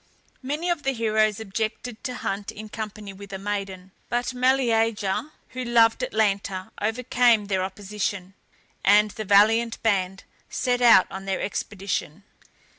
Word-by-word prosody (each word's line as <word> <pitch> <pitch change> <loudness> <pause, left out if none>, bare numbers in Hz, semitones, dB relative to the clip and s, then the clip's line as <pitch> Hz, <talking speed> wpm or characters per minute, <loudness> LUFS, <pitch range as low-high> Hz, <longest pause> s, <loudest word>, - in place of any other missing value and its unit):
Many 295 +6 -3
of 340 -4 -1
the 270 -1 0
heroes 215 -3 +1
objected 220 +2 -4
to 250 - -3
hunt 200 -3 -4
in 215 +1 -9
company 210 -2 -7
with 200 0 -11
a 190 - -4
maiden; 195 -2 -5 0.2
but 245 +2 -1
Meleager, 230 -3 +1 0.2
who 255 0 -5
loved 230 -2 +3
Atalanta, 200 -2 -1
overcame 235 0 +2
their 190 -2 0
opposition, 195 -1 -4 0.5
and 210 +1 +5
the 215 - -6
valiant 225 +4 +4
band 190 -3 0 0.3
set 250 -1 0
out 230 -6 +7
on 190 0 -7
their 195 -1 -1
expedition. 195 -4 -4
215 Hz, 135 wpm, -25 LUFS, 195-235 Hz, 0.5 s, out